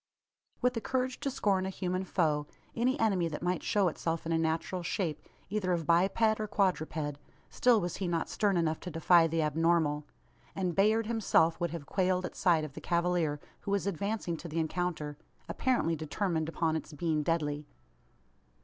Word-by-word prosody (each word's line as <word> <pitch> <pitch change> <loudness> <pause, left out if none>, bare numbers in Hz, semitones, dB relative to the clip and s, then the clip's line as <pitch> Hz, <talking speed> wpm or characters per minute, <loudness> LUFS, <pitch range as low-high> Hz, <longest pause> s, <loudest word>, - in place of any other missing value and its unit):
With 250 0 +3
the 230 - -3
courage 255 +2 -1
to 285 - -1
scorn 195 -7 +1
a - - -2
human 185 0 -2
foe 150 -6 +1 0.3
any 255 +4 +1
enemy 195 -6 +2
that 155 0 -5
might 180 0 0
show 205 -4 +2
itself 165 0 -2
in 165 - -2
a 165 - +3
natural 165 +3 -1
shape, 170 -2 -2 0.3
either 190 -2 0
of 165 -2 -1
biped 195 +6 +3
or 215 - -2
quadruped 155 -7 -1 0.3
still 245 -3 +4
was 175 -3 -3
he 190 - -2
not 170 -2 -1
stern 200 -3 +1
enough 160 -2 +1
to 180 - -6
defy 165 +1 +5
the 165 0 0
abnormal; 155 -1 +1 0.5
and 185 -2 -1
Bayard 215 +5 +3
himself 210 -7 +2
would 175 - +1
have 165 -2 -6
quailed 185 +1 +1
at - - -6
sight 170 -4 +3
of 150 -3 -6
the - - -8
cavalier 170 -3 +1 0.2
who - - -7
was 200 -1 +1
advancing 200 -1 -2
to 170 - -8
the 160 0 -5
encounter 160 -3 -2 0.3
apparently 240 -11 +1
determined 160 +1 -2
upon 165 -1 0
its 160 0 -5
being 155 0 0
deadly! 150 -2 -1
175 Hz, 180 wpm, -31 LUFS, 160-195 Hz, 0.5 s, defy